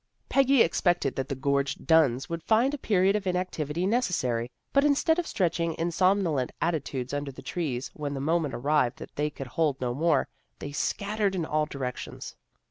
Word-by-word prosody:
Peggy 270 -2 +5
expected 170 -4 +1
that 135 0 -3
the 140 - -2
gorged 140 +1 -1
Dunns 140 -6 +3
would 170 0 -4
find 230 - +2
a 295 - -3
period 195 -3 +2
of 205 -2 -2
inactivity 180 -3 -1
necessary, 145 - 0 0.2
but 275 - +4
instead 295 +3 +3
of 345 - -2
stretching 170 -3 0
in 170 +1 -1
somnolent 180 -7 +2
atti 165 -4 0
tudes 130 -1 -5
under 145 -1 -3
the 130 - -12
trees 135 -7 -3
when 145 -2 -4
the - - -3
moment 155 0 0
arrived 135 -2 +1
that - - -10
they 150 +1 0
could 140 -2 -7
hold 145 +1 0
no 125 -1 -1
more, 155 +1 +2 0.3
they 145 - -7
scattered 200 +6 -1
in 170 -3 -1
all 155 -1 0
directions. 130 -4 -6
160 Hz, 185 wpm, -27 LUFS, 140-185 Hz, 0.3 s, Peggy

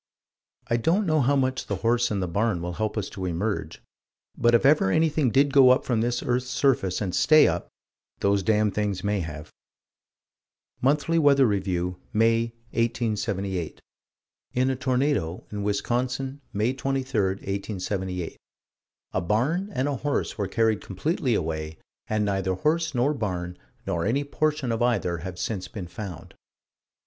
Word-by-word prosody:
I 120 -2 +1
don't 170 - +2
know 155 -3 +2
how 140 +3 +3
much 130 -1 0
the 100 - -1
horse 120 +1 +3
and 100 -3 -1
the - - -2
barn 100 +2 0
will 90 +1 -4
help 110 +4 -2
us 105 - -1
to 95 - -6
emerge: 95 +5 -3 0.5
but, 120 0 +4
if 120 - +3
ever 140 -8 +5
anything 155 +1 +2
did 140 +3 +3
go 135 -3 +8
up 130 +2 +4
from 115 -3 +1
this 120 +1 -1
earth's 125 +1 0
surface 120 -11 +1
and 95 -4 -2
stay 155 0 +6
up - - -2 0.5
those 100 0 +2
damned 105 0 +2
things 100 -3 -1
may 105 0 0
have: 75 -3 -6 1.3
Monthly 150 +5 +2
Weather 140 -3 +5
Review, 90 -4 -1 0.2
May, 115 +1 +3 0.3
1878: 100 -6 -1 0.8
In 130 +1 +2
a - - -1
tornado, 130 - 0
in 105 -1 -4
Wisconsin, 125 +6 -1
May 110 +5 0
23, 135 -3 -1
1878, 95 -2 -4 0.7
"a - - 0
barn 135 - 0
and 130 -6 -1
a 140 -2 -1
horse 145 +3 -1
were 100 -3 -2
carried 110 -2 +1
completely 125 - -1
away, 80 -3 -3 0.3
and 110 -1 +1
neither 95 -2 0
horse 160 - 0
nor 130 +5 +2
barn, 90 -8 -3 0.3
nor 90 -4 -1
any 135 +6 +1
portion 150 -2 -1
of 115 +1 -1
either 100 -8 +1
have 90 +1 -7
since 95 -1 -3
been 105 -7 -7
found." 90 -3 -8
115 Hz, 155 wpm, -26 LUFS, 95-135 Hz, 1.3 s, go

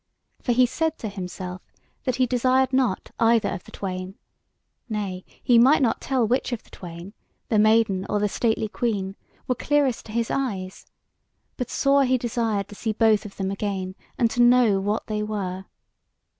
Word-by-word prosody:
For 245 - 0
he 250 +1 +5
said 320 +5 -1
to 220 - -5
himself 185 -1 -6 0.4
that 255 - +1
he 255 0 +3
desired 255 +2 +2
not 255 -7 +1
either 225 -2 +4
of 175 - -5
the - - -14
twain; 185 0 -5 0.7
nay, 200 -4 -3 0.2
he 240 -2 +5
might 270 +4 +6
not 230 - +1
tell 255 -4 +1
which 250 +3 0
of 240 - -3
the - - -24
twain, 175 +2 -9 0.4
the 220 - +3
maiden 215 -3 +3
or 210 - +1
the 210 - +2
stately 220 +1 0
queen, 205 -4 -2 0.3
were 255 - +2
clearest 280 -2 0
to - - -9
his 230 +1 -1
eyes; 195 -9 -3 0.7
but 250 -2 -4
sore 275 0 +3
he 255 0 +3
desired 230 -4 -1
to - - -10
see 220 +2 -2
both 220 -1 +3
of 200 - -10
them 195 -1 -2
again, 195 -2 -3 0.2
and 230 -2 +2
to 245 - +1
know 240 -4 +5
what 205 +3 -1
they 215 -1 -2
were. 190 -3 -3
220 Hz, 180 wpm, -24 LUFS, 195-250 Hz, 0.7 s, might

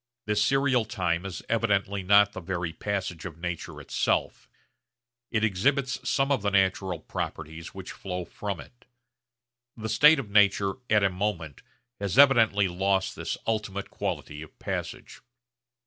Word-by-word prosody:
This 105 0 +2
serial 135 -1 +2
time 90 -3 -1
is 90 -3 -7
evidently 100 -3 +1
not 100 +2 +5
the 95 - -6
very 85 -2 -3
passage 95 -4 -3
of 85 -4 -7
nature 90 0 -5
itself. - - -1 0.8
It 110 -2 0
exhibits 130 +7 0
some 135 -1 +1
of 135 -6 +2
the 100 - +1
natural 95 -2 +1
properties 80 +3 -6
which 95 -1 -7
flow 90 -2 -5
from 100 -1 -5
it. 120 +11 -14 0.9
The 110 0 -5
state 150 +7 +6
of 120 -7 -5
nature 100 -1 +4 0.2
'at 105 -2 +4
a 100 - +3
moment' 90 -7 -3 0.4
has 100 +2 -2
evidently 115 -8 +6
lost 95 +2 0
this - - -4
ultimate 100 -3 -2
quality 75 0 -4
of 80 - -12
passage. - - -5
100 Hz, 145 wpm, -27 LUFS, 90-110 Hz, 0.9 s, state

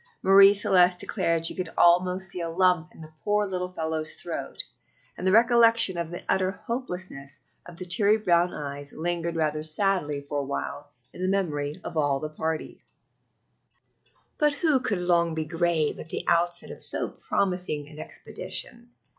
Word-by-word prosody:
Marie 195 +1 +7
Celeste 185 -3 +3
declared 165 -1 0
she - - +3
could 180 -3 -4
almost 180 +2 +3
see 180 -1 -4
the 165 - -3
lump 180 -1 +2
in - - -14
the 155 0 -12
poor 210 0 +1
little 180 -2 -4
fellow's 160 -2 -3
throat, - - -5 0.5
and 185 - -3
the - - +4
recollection 230 -2 +5
of 170 -1 -3
the 175 - -7
utter 185 -1 +1
hopelessness 185 - -6 0.3
of 175 -1 -12
the 185 - -7
teary 205 +4 +4
brown 175 -4 +2
eyes 145 -1 -7
lingered 170 +1 -2
rather 155 -1 -1
sadly 155 -3 -1
for 145 0 -2
a - - -2
while 140 +1 -5 0.2
in - - -10
the 185 - 0
memory 150 -7 -1
of - - -6
all 145 -2 +2
of 135 - -5
the 155 - -3
party. 160 0 -4 1.6
But 295 -1 +3
who 290 -2 +2
could 215 -5 -1
long 170 -2 +1
be 160 -1 -2
grave 165 -1 0
at 160 - -9
the - - -4
outset 175 0 +1
of - - -10
so - - +1
promising 180 -6 -2
an 150 0 -13
expedition! 235 +8 -3
175 Hz, 170 wpm, -26 LUFS, 155-190 Hz, 1.6 s, Marie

